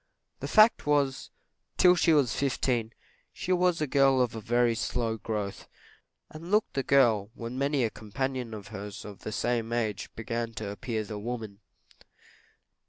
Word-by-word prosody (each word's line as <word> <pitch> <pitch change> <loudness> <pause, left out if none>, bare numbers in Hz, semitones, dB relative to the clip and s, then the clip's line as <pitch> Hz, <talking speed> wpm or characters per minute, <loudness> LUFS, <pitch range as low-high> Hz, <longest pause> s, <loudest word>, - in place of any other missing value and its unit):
The - - -4
fact 215 -6 +5
was, 140 -3 +1 0.5
till 180 0 +6
she 165 -1 +3
was 140 -7 +3
fifteen, 125 -4 0 0.4
she 185 - -4
was 180 -1 +2
a - - +2
girl 135 -1 +3
of 125 -2 +1
a 110 - -6
very 120 +2 +2
slow 115 0 -2
growth, 105 -3 -4 0.6
and 165 +3 -9
looked 210 +2 +2
the 135 - 0
girl 120 -7 +3
when 115 +1 -6
many 140 0 +1
a 110 - 0
companion 125 +2 -4
of 105 -2 -9
hers 105 -2 -7
of 105 -2 -9
the 110 - -6
same 115 0 -1
age 110 -4 -2
began 115 0 -3
to 105 -2 -4
appear 110 +1 -3
the 105 0 -6
woman. 110 -3 -5
120 Hz, 165 wpm, -28 LUFS, 110-140 Hz, 0.6 s, till